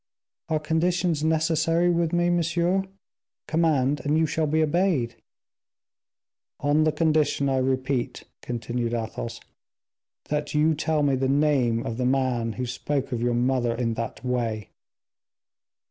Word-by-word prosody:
"Are 155 -1 +1
conditions 165 +1 0
necessary 160 +2 +2
with 170 -1 +1
me, 175 0 +2
monsieur? 175 +2 +1 0.6
Command, 150 -4 +1
and 150 +1 +1
you 160 - +3
shall 155 0 0
be 160 +2 +2
obeyed." 155 -7 +1 1.5
"On 150 +2 +2
the 155 - +3
condition, 155 -3 +1
I 135 -1 +1
repeat," 130 -1 -1 0.2
continued 120 0 -3
Athos; 115 0 -4 0.9
"that 150 0 -2
you 155 +2 +4
tell 155 0 0
me 140 -1 +2
the 130 0 0
name 135 -5 +2
of 115 - -4
the 125 - -1
man 125 -4 0
who 125 +4 -3
spoke 135 +3 -3
of 120 -2 -2
your 120 0 +1
mother 120 -1 +1
in 115 -1 -1
that 115 +2 -5
way." 115 -4 -2
145 Hz, 135 wpm, -25 LUFS, 125-160 Hz, 1.5 s, you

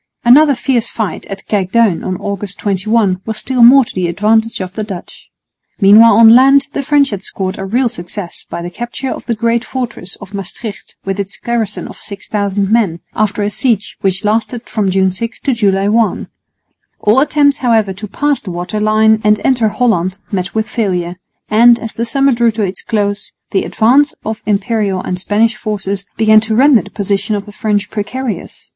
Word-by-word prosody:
Another 280 +4 +6
fierce 240 -1 0
fight 220 -4 -4
at 195 0 -8
Kijkduin 205 -1 +1
on 185 -1 -3
August 200 0 -5
21 200 -1 0
was 220 +1 -5
still 255 -1 -1
more 255 +2 +7
to - - -11
the 180 -2 -1
advantage 220 +5 +1
of 185 -1 -5
the 215 - -4
Dutch. 195 -4 -9 0.5
Meanwhile 215 +3 +7
on 225 0 +7
land 275 +3 +5
the - - -2
French 285 -1 +2
had 200 -2 -4
scored 190 -1 -4
a 195 - -4
real 245 +6 +1
success 175 -2 -7
by 170 - -5
the 175 - -6
capture 240 +5 -5
of - - -7
the 235 - 0
great 230 +1 0
fortress 240 -8 -5
of 200 0 -13
Maestricht 200 +2 -7
with 195 +1 -3
its 200 0 -4
garrison 230 -4 -3
of - - -12
6000 200 -1 -3
men, 200 -8 +1
after 210 -1 0
a 205 - -1
siege 220 -2 -1
which 195 +2 -1
lasted 225 +3 -1
from 205 -3 -1
June 190 0 +2
6 230 +5 -5
to 275 - 0
July 200 -3 +1
1. 225 +1 +1 0.7
All 215 +5 +3
attempts, 290 0 +2
however, 225 -6 +1
to 205 +3 -8
pass 290 +7 -1
the 205 - -8
water 175 +4 -4
line 215 +1 +3
and 210 0 +3
enter 245 -4 +2
Holland 190 -6 0
met 185 -1 -3
with 220 0 0
failure; 180 -6 -2 0.3
and, 235 +2 +5
as 225 -1 -7
the 230 - -3
summer 275 +4 +2
drew 235 -1 +2
to 220 -1 -2
its 190 -1 -2
close, 205 -2 -2 0.2
the 195 - 0
advance 275 +7 +2
of 220 0 -4
Imperial 205 -1 0
and 180 - -4
Spanish 215 +4 +1
forces 200 -3 -4
began 220 -1 +5
to 220 0 -2
render 260 -2 +5
the - - -13
position 200 +1 -2
of 200 -1 -4
the 205 - -11
French 205 -1 -2
precarious. 225 +3 -5
215 Hz, 190 wpm, -14 LUFS, 195-235 Hz, 0.7 s, more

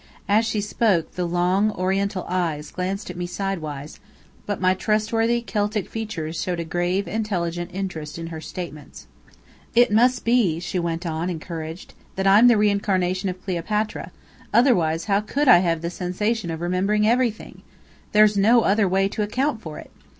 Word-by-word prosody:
As 215 +3 +3
she 215 -2 -1
spoke, 205 -4 +1
the 180 -1 -2
long, 180 +4 +2
oriental 190 +1 -1
eyes 165 -5 -2
glanced 185 +1 -3
at - - -10
me 175 0 -4
sidewise, 165 -6 -5 0.5
but 205 -2 -2
my 185 0 +3
trustworthy 225 +4 0
Celtic 210 -2 -1
features 180 -8 -4
showed 180 -2 -2
a - - -1
grave, 175 +4 -1
intelligent 175 -6 -2
interest 170 -6 -5
in 165 - -5
her 160 - -6
statements. 160 -5 -8 0.7
"It 240 -2 +5
must 245 +4 +3
be," 230 -9 +2
she 180 +1 -3
went 170 +1 -3
on, 165 +2 -2
encouraged, 165 0 -6 0.2
"that 190 - -2
I'm 205 +5 +7
the 240 -2 +5
reincarnation 195 -3 +1
of 185 0 -8
Cleopatra, 210 +4 -2 0.4
otherwise 175 - +3
how 200 -1 +2
could 280 +7 -1
I 175 - +9
have 165 -3 0
the 170 - -2
sensation 190 +3 -2
of 165 0 -4
remembering 195 +4 +1
everything? 235 -1 0 0.5
There's 210 0 +5
no 225 +4 +5
other 205 -2 +2
way 195 +1 +2
to 215 - -4
account 245 +3 -1
for 155 -5 -8
it! - - -11
190 Hz, 165 wpm, -23 LUFS, 175-215 Hz, 0.7 s, I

